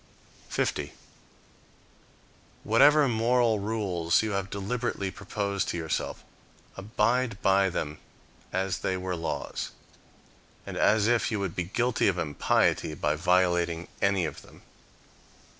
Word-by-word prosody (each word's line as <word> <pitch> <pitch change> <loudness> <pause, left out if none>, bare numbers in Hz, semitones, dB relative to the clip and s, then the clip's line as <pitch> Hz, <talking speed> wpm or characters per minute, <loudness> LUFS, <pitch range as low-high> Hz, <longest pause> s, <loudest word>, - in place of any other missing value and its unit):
50. - - -1 1.7
Whatever 145 +6 +5
moral 115 -1 +2
rules 100 -5 0
you 110 - -2
have 100 -1 -2
deliberately 100 -1 -3
proposed 100 -1 -3
to - - -2
yourself. 80 -2 -3 0.5
abide 110 +2 0
by 95 0 +4
them 75 -3 -4 0.5
as 95 0 -1
they 95 - -1
were 90 0 -3
laws, 85 -1 -4 1.0
and - - -6
as 105 -1 +3
if 120 +1 +2
you 105 - -1
would 95 -4 -3
be 90 - -1
guilty 120 +6 +1
of 95 -2 +1
impiety 75 -1 +1
by 75 0 0
violating 85 0 +1
any 100 -3 +2
of 80 - -6
them. - - -17
100 Hz, 120 wpm, -28 LUFS, 90-110 Hz, 1.7 s, Whatever